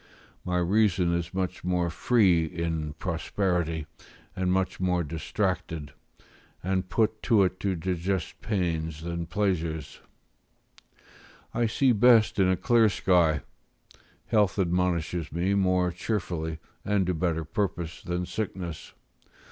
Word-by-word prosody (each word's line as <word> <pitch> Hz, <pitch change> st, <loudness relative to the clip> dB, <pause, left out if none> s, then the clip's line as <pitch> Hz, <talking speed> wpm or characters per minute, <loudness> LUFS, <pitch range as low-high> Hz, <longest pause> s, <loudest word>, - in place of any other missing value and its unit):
My 90 Hz, -1 st, -1 dB
reason 90 Hz, -1 st, +2 dB
is 85 Hz, 0 st, -2 dB
much 95 Hz, -1 st, -3 dB
more 90 Hz, -1 st, 0 dB
free 90 Hz, -4 st, +3 dB
in 80 Hz, -2 st, -3 dB
prosperity, 85 Hz, -1 st, -1 dB, 0.5 s
and 90 Hz, -1 st, 0 dB
much 95 Hz, 0 st, 0 dB
more 90 Hz, -1 st, +1 dB
distracted, 80 Hz, -1 st, -3 dB, 0.7 s
and 95 Hz, 0 st, -1 dB
put 110 Hz, +2 st, +1 dB
to't 95 Hz, -6 st, +3 dB
to 95 Hz, 0 st, 0 dB
digest 90 Hz, +1 st, -2 dB
pains 80 Hz, -6 st, -2 dB
than 85 Hz, 0 st, -4 dB
pleasures: 85 Hz, -6 st, -2 dB, 1.5 s
I 120 Hz, -1 st, +1 dB
see 130 Hz, +4 st, +3 dB
best 110 Hz, -1 st, +5 dB
in 95 Hz, -1 st, +4 dB
a 95 Hz, -, +2 dB
clear 115 Hz, +1 st, +4 dB
sky; 85 Hz, -6 st, +2 dB, 0.8 s
health 105 Hz, -3 st, +2 dB
admonishes 90 Hz, -3 st, 0 dB
me 90 Hz, +5 st, 0 dB
more 90 Hz, -2 st, +2 dB
cheerfully, 85 Hz, -4 st, -3 dB, 0.3 s
and 100 Hz, -2 st, +1 dB
to 90 Hz, -, 0 dB
better 80 Hz, -1 st, -1 dB
purpose, 85 Hz, -2 st, -3 dB
than 90 Hz, +1 st, -2 dB
sickness. 90 Hz, -3 st, -5 dB
90 Hz, 115 wpm, -27 LUFS, 85-100 Hz, 1.5 s, best